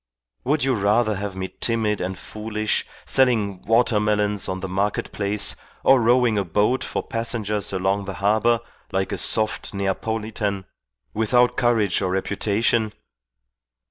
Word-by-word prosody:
Would 145 +2 +1
you 135 0 +2
rather 105 0 +2
have 100 -1 -5
me 95 0 -5
timid 110 -3 +1
and 95 +1 -3
foolish, 110 +1 -3 0.2
selling 110 -8 +2
water 115 -1 +3
melons 105 -1 0
on 95 0 -3
the 95 - -4
market 100 +3 -1
place 100 0 +1 0.3
or 130 -1 +5
rowing 120 -2 +3
a - - 0
boat 105 +8 +1
for - - -3
passengers 110 -3 -1
along 95 +1 0
the 95 -1 -5
harbour, 110 +6 +2 0.3
like 95 0 -1
a - - -2
soft 110 -2 0
Neapolitan 100 0 -2 0.5
without 120 +3 +2
courage 115 -6 +2
or 95 - 0
reputation? 105 +3 0
105 Hz, 140 wpm, -23 LUFS, 100-115 Hz, 0.5 s, or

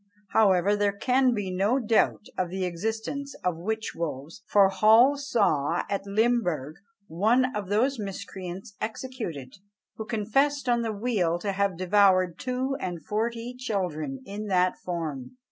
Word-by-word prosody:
However, 200 -2 +4
there 205 -1 0
can 255 +3 +3
be 200 -3 -3
no 205 +7 +2
doubt 225 -3 +1
of 180 -2 -1
the 190 +1 -2
existence 225 +10 -4
of 180 -2 0
"witch 220 +5 -3
wolves;" 160 0 -5
for 200 0 +5
Hall 220 +8 +5
saw 195 - +1
at 200 0 -2
Limburgh 200 - 0 0.3
"one 225 +9 +2
of 205 -3 -4
those 245 +5 +1
miscreants 195 0 -7
executed, 215 - -5 0.4
who 220 - -5
confessed 265 +6 0
on 240 -1 +2
the 225 -1 -1
wheel 200 -6 0
to 200 +3 -2
have 195 -2 0
devoured 185 -1 +3
two 255 +2 -2
and 175 - -5
forty 230 +3 -2
children 175 - -3
in 210 +2 -6
that 185 -2 +2
form." 165 - -5
205 Hz, 145 wpm, -27 LUFS, 180-235 Hz, 0.4 s, for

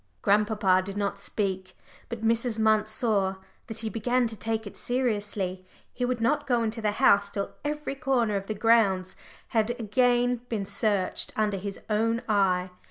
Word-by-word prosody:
Grandpapa 205 -2 +3
did 195 +1 -6
not 200 -1 -2
speak, 190 -2 -3 0.3
but 225 -2 -5
Mrs. 230 0 +1
Munt 215 -1 +3
saw 210 -4 +1 0.3
that 225 -1 -2
he 225 - -3
began 245 +3 +1
to 225 -1 -3
take 220 +2 -3
it 200 - -9
seriously. 205 -7 -2 0.3
He 250 - -1
would 250 -1 -1
not 260 +6 +1
go 240 -3 +2
into 225 +1 -2
the 210 -1 0
house 200 -1 +4
till 200 -1 -4
every 300 -1 -3
corner 265 -6 0
of 195 0 -3
the 215 - -3
grounds 200 -4 +3 0.3
had 220 -1 +1
again 245 +2 +2
been 210 -4 -2
searched 200 -3 0
under 210 -2 0
his 200 +1 -5
own 230 +2 0
eye. 190 -4 +2
215 Hz, 165 wpm, -27 LUFS, 200-235 Hz, 0.3 s, house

